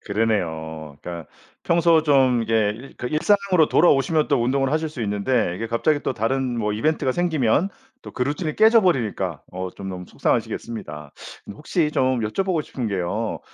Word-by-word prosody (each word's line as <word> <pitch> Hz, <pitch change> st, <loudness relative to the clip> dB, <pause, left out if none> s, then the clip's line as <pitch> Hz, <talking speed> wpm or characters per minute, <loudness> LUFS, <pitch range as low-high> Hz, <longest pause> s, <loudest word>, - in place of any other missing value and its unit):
그러네요. 80 Hz, -8 st, -2 dB
그러니까 85 Hz, -3 st, -7 dB, 0.4 s
평소 170 Hz, -1 st, +4 dB
좀 135 Hz, -5 st, +3 dB
이게 110 Hz, +3 st, -1 dB, 0.2 s
일상으로 185 Hz, 0 st, +2 dB
돌아오시면 155 Hz, -1 st, +3 dB
또 140 Hz, -5 st, +2 dB
운동을 135 Hz, +2 st, +1 dB
하실 160 Hz, +1 st, 0 dB
수 145 Hz, -6 st, -6 dB
있는데 105 Hz, -1 st, 0 dB
이게 115 Hz, +4 st, -4 dB
갑자기 115 Hz, +6 st, +1 dB
또 -, -, -2 dB
다른 125 Hz, +3 st, -1 dB
뭐 105 Hz, -2 st, -1 dB
이벤트가 130 Hz, +5 st, 0 dB
생기면 160 Hz, -, +1 dB, 0.3 s
또 -, -, -10 dB
그 -, -, -2 dB
루틴이 150 Hz, +3 st, -2 dB
깨져 220 Hz, +1 st, +6 dB
버리니까 110 Hz, -, -1 dB
어 95 Hz, 0 st, -4 dB
좀 95 Hz, +1 st, -8 dB
너무 90 Hz, -1 st, -6 dB
속상하시겠습니다. 75 Hz, -11 st, -3 dB, 0.4 s
혹시 150 Hz, -, -1 dB
좀 130 Hz, -3 st, +1 dB
여쭤보고 165 Hz, -, -1 dB
싶은 125 Hz, -4 st, -5 dB
게요. 100 Hz, +3 st, -2 dB
125 Hz, 365 characters per minute, -22 LUFS, 105-155 Hz, 0.4 s, 깨져